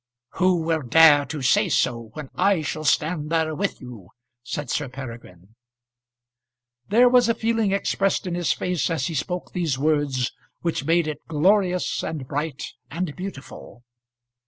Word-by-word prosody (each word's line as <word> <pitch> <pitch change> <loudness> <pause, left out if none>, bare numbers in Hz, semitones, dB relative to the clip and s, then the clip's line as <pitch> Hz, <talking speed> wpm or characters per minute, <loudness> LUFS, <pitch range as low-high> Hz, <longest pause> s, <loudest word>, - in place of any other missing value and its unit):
"Who 180 -2 +2
will 160 -1 0
dare 145 +2 +6
to 150 -4 -5
say 130 - +3
so, 115 -2 0
when 150 -4 -8
I 190 -3 +2
shall 155 +1 -4
stand 150 +1 +1
there 160 -1 0
with 195 +6 -2
you?" 120 -8 -11 0.3
said 135 +2 -5
Sir 145 -3 -2
Peregrine. 115 -7 -10 1.3
There 240 +5 +5
was 245 -1 +4
a 230 - +2
feeling 225 -2 0
expressed 195 0 0
in 180 - -3
his 175 -6 0
face 180 +3 -1
as 160 -6 -1
he 165 - -3
spoke 180 +3 -3
these 165 -7 -1
words, 145 -4 0 0.3
which 165 -5 -2
made 165 +1 +2
it 155 - -4
glorious, 180 +3 +1
and 145 -5 -5
bright, 145 0 -3 0.3
and 165 -1 -4
beautiful. 145 -9 -9
155 Hz, 155 wpm, -23 LUFS, 135-180 Hz, 1.3 s, dare